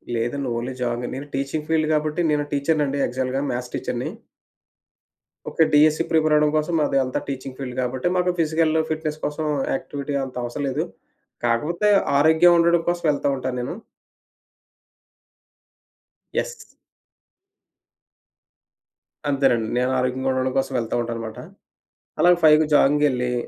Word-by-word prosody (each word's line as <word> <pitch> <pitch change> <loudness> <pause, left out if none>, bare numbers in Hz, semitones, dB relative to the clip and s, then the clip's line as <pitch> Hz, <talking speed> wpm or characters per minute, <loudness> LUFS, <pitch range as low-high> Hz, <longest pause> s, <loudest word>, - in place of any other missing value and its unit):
లేదండి. 125 +4 -2
Only 125 +2 -4
jogging. 120 0 -2
నేను 140 +2 -7
teaching 140 +3 -3
field 155 -1 +1
గాబట్టి, 155 +2 0
నేను 145 0 +1
టీచరునండి 145 -1 0
యాక్చువల్‌గా 130 +2 -1
మ్యాథ్స్ 125 0 -5
టీచరుని. - - -3 1.4
ఓకే. 165 - +3
డీఎస్సీ 155 +2 +5
ప్రిపేరవ్వడం 155 -1 +3
కోసం 155 +2 -1
అది 135 - 0
అంతా 130 - -2
టీచింగ్ 135 -1 -6
ఫీల్డ్ 125 -3 -6
గాబట్టి, 125 +4 -1
మాకు 180 0 +2
ఫిజికల్ 160 0 +2 0.2
ఫిట్‌నెస్ 155 -1 -3
కోసం 150 +2 -3 0.3
యాక్టివిటీ 140 +1 -5
అంత 130 -1 -7
అవసర 120 +4 -5
లేదు. 130 - -1 0.6
కాకపోతే 155 - +1 0.3
ఆరోగ్యం 160 +4 +5
ఉండడం 170 0 +4
కోసం 175 0 -2
వెళ్తా 145 -1 0
ఉంటా 130 - -3
నేను. 125 - -3 2.6
యెస్. 480 -2 -4 2.5
అంతేనండి. 135 -5 +2
నేను 125 +1 +1
ఆరోగ్యగుండడం 130 +1 0
కోసం 135 0 -1
వెళ్తా 115 0 -3
ఉంటానుమాట. 115 -1 -5 0.8
అలాగ 175 0 +6
5కి 155 0 +6
జాగింగ్‌కెళ్ళి, 135 -4 +3
140 Hz, 120 wpm, -22 LUFS, 130-155 Hz, 2.6 s, అలాగ